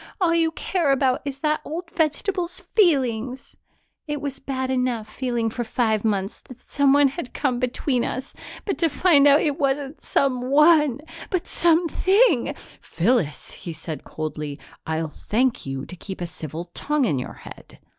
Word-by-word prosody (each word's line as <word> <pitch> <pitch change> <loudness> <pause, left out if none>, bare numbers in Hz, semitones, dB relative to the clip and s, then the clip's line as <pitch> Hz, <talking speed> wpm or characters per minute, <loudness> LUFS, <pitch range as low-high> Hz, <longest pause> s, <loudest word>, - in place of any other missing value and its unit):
All 350 -3 +3
you 330 -1 +3
care 335 -4 0
about 265 -1 +2
is 275 -1 -5
that 305 0 +1
old 330 +2 -6
vegetable's 350 +2 -1 0.2
feelings! 260 - +1 0.5
It 295 -1 -2
was 275 -1 -5
bad 260 -1 -3
enough, 250 -4 0
feeling 235 0 -2
for 240 - -3
five 220 -2 0
months 200 -3 -1
that 255 -1 -14
someone 285 +1 +3
had 270 -2 -7
come 255 -4 0
between 250 0 0
us, 260 +2 -4 0.3
but 395 - -2
to 330 - +3
find 290 -1 +5
out 285 +1 +6
it 295 -1 0
wasn't 275 +1 -1
some_one_ 280 +2 +3 0.3
but 365 -3 0
some_thing_ 345 - +3
!" - - -24
"Phyllis," 175 - 0
he 170 -4 -7
said 155 -3 -7
coldly, 150 -2 -5 0.3
"I'll 160 0 -1
thank 235 - -1
you 135 0 -4
to 180 - -9
keep 190 +2 -8
a 175 - -2
civil 160 -1 -7
tongue 295 -2 0
in 145 - 0
your 125 - -6
head." - - -12
265 Hz, 160 wpm, -23 LUFS, 225-300 Hz, 0.5 s, out